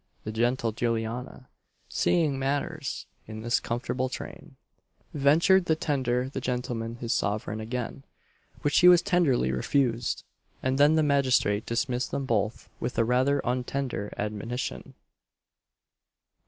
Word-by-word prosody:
The 110 - -4
gentle 120 +1 +1
Juliana, 115 +3 -3 0.4
seeing 155 -6 +1
matters 145 +2 -2 0.2
in 110 0 -7
this 120 +3 +2
comfortable 125 +2 -2
train, 140 +2 -8 0.6
ventured 165 +6 +4
to 160 - +3
tender 130 -5 0
the 135 0 -5
gentleman 120 -2 -3
his 120 -1 -2
sovereign 105 +1 -1
again, 120 +4 -4 0.6
which 145 0 +3
he 180 - +7
as 175 -1 +7
tenderly 170 - +2
refused; 115 - 0 0.4
and 130 +1 0
then 145 +2 +6
the 160 - +3
magistrate 130 -8 +2
dismissed 125 +2 -1
them 135 - -2
both 110 -3 -1
with 125 - -4
a - - +4
rather 130 +4 +2
untender 125 -3 -2
admonition. 105 - -4
125 Hz, 125 wpm, -27 LUFS, 115-140 Hz, 0.6 s, he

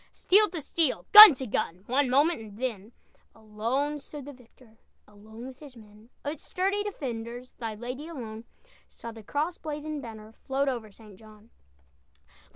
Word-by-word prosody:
Steel 420 +2 +3
to 330 -4 -7
steel, 310 -2 -1
gun 420 -7 +13
to 260 - -6
gun, 185 -5 -3
One 260 +3 +1
moment, 285 +4 +2
and 210 -2 -12
then 225 -4 -5 0.4
Alone 230 +7 -3
stood 290 -1 -10
the 290 - -9
victor, 240 -2 -22 0.3
Alone 220 +3 -13
with 260 -1 -11
his 285 -4 -13
men! 215 0 -17 0.2
"Of 290 - -2
its 310 - -15
sturdy 390 +3 -1
defenders, 245 - -6
Thy 225 -3 -5
lady 250 +7 -7
alone 230 -8 -8 0.4
Saw 230 - -10
the 225 0 -12
cross 300 - -3
blazoned 300 -1 -5
banner 220 -3 -11
Float 275 +1 -1
over 230 -5 -5
St. 205 -2 -16
John." 215 0 -18
250 Hz, 160 wpm, -27 LUFS, 220-290 Hz, 0.4 s, gun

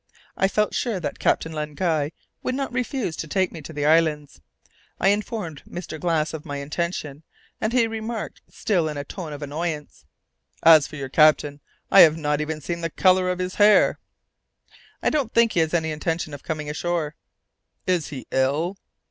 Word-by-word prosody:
I 195 - +2
felt 210 +2 0
sure 230 -6 -1
that 165 - -5
Captain 160 - +1
Len 150 -1 -4
Guy 160 -5 0 0.3
would 255 - -2
not 270 -2 -3
refuse 250 - -2
to 165 - -4
take 185 +4 0
me 165 - -8
to 150 - -9
the 145 -2 -2
islands. 150 - +2 0.6
I 195 - +4
informed 205 - -2
Mr. 175 -3 -6
Glass 160 -2 0
of 155 -2 -6
my 145 -2 -5
intention, 150 0 -4 0.4
and 220 - 0
he 245 -1 +3
remarked, 225 0 -5
still 175 -7 0
in 150 - -5
a 145 - -3
tone 160 +2 -7
of 145 0 -6
annoyance, 150 +1 -4 0.6
"As 160 -3 +7
for - - -11
your 135 -3 -5
captain, 150 0 +4 0.3
I 195 - +8
have 160 -3 +8
not 150 -1 0
even 155 0 -4
seen 170 +2 -4
the 165 - -1
colour 185 +2 +3
of 180 - -1
his 185 0 -3
hair." 210 0 +5 1.0
"I - - +2
don't 280 -7 0
think 230 -1 +5
he - - +1
has 160 -1 +2
any 160 -2 0
intention 155 0 -2
of 145 - -8
coming 155 -2 -4
ashore." 160 0 -2 0.7
"Is 180 -4 +1
he 135 -4 -7
ill?" 145 +8 0
160 Hz, 185 wpm, -24 LUFS, 150-185 Hz, 1.0 s, I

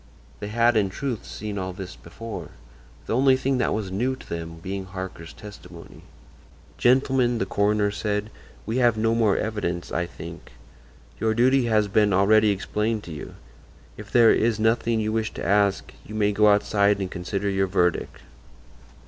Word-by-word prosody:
They 105 - -5
had, 115 +2 +2
in 100 -3 +2
truth, 125 +2 -4
seen 105 -1 -5
all 95 0 -4
this 95 -1 -8
before; 110 +7 -8 0.6
the - - -1
only 130 +1 +4
thing 130 0 0
that 125 - +1
was 105 -3 -3
new 125 +7 0
to - - -15
them 85 0 -6
being 95 +3 -5
Harker's 95 -3 -7
testimony. 100 -5 -12 0.8
"Gentlemen," 125 -1 +3
the 95 - -1
coroner 105 +1 +1
said, 105 0 -2 0.3
"we 115 +3 -2
have 120 -3 +3
no 115 +1 +2
more 110 -4 +2
evidence, 95 -5 -3
I 85 - -1
think. - - -10 0.7
Your 110 0 +1
duty 130 +2 +3
has 110 -2 +2
been 105 0 +2
already 105 +3 +4
explained 105 +2 -1
to 85 - -9
you; 75 - -8 0.6
if - - -10
there 115 -2 +6
is 115 -1 +1
nothing 115 +1 +1
you 110 0 -1
wish 110 -1 -1
to - - -5
ask 100 +1 +1
you 110 - -9
may 105 -1 +2
go 105 +1 +3
outside 100 0 +3
and 95 -2 -3
consider 95 +2 -3
your 95 -1 +1
verdict." 90 -2 0
105 Hz, 170 wpm, -24 LUFS, 95-115 Hz, 0.8 s, there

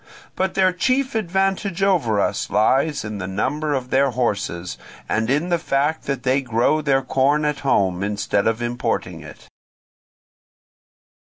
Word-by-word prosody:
But 190 0 -1
their 185 -1 +3
chief 255 +8 0
advantage 195 -1 -1
over 150 - +2
us - - -1
lies 135 +6 +2
in 105 -1 -5
the 95 - -4
number 145 +10 -1
of 130 -1 -4
their 135 +1 +3
horses, 105 -8 -2 0.3
and 110 +1 0
in 150 +7 +1
the 175 -1 +1
fact 145 +1 0
that 135 -3 -3
they 135 +2 +2
grow 125 +5 +1
their 135 -2 +1
corn 140 +4 +1
at 150 -1 -1
home 95 -9 +1
instead 100 0 0
of 115 +1 0
importing 120 0 -2
it. - - -13
135 Hz, 145 wpm, -21 LUFS, 115-160 Hz, 0.3 s, their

